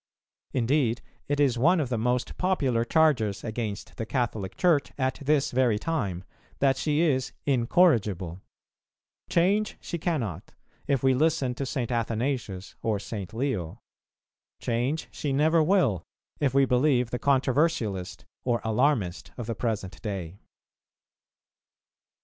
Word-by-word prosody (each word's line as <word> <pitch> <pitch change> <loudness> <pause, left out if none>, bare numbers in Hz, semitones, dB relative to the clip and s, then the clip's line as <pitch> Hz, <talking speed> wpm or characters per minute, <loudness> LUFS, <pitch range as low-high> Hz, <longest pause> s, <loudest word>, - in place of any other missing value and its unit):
Indeed 125 -1 +1 0.2
it 145 0 0
is 130 -5 +3
one 170 +7 +4
of 140 -5 -1
the 120 - 0
most 125 +2 0
popular 140 -11 +1
charges 120 -8 +2
against 110 -3 -5
the 110 - -3
Catholic 110 -7 -2
Church 170 -6 +2
at 130 -1 -1
this 145 0 +2
very 125 -4 +2
time, 105 - -2 0.3
that 135 -1 +3
she 150 +3 0
is 130 -6 +1
"incorrigible;" 115 - +2 0.9
change 200 +5 +2
she 170 - -5
cannot, 120 - -3 0.3
if 140 -3 +1
we 130 0 +5
listen 145 -2 +1
to 135 +2 -4
St. 125 -3 -2
Athanasius 115 -4 -2
or 110 -2 0
St. 100 -2 -6
Leo; 110 - -2 0.8
change 125 +7 -1
she 145 - -3
never 155 +4 +3
will, 155 - +3 0.4
if 140 -3 +2
we 135 +1 +4
believe 125 -1 +2
the 125 - -2
controversialist 130 - 0 0.2
or 120 -2 +1
alarmist 110 -5 +1
of 120 - -4
the 115 - -2
present 105 -4 -3
day. 95 -3 -5
125 Hz, 130 wpm, -27 LUFS, 110-145 Hz, 0.9 s, we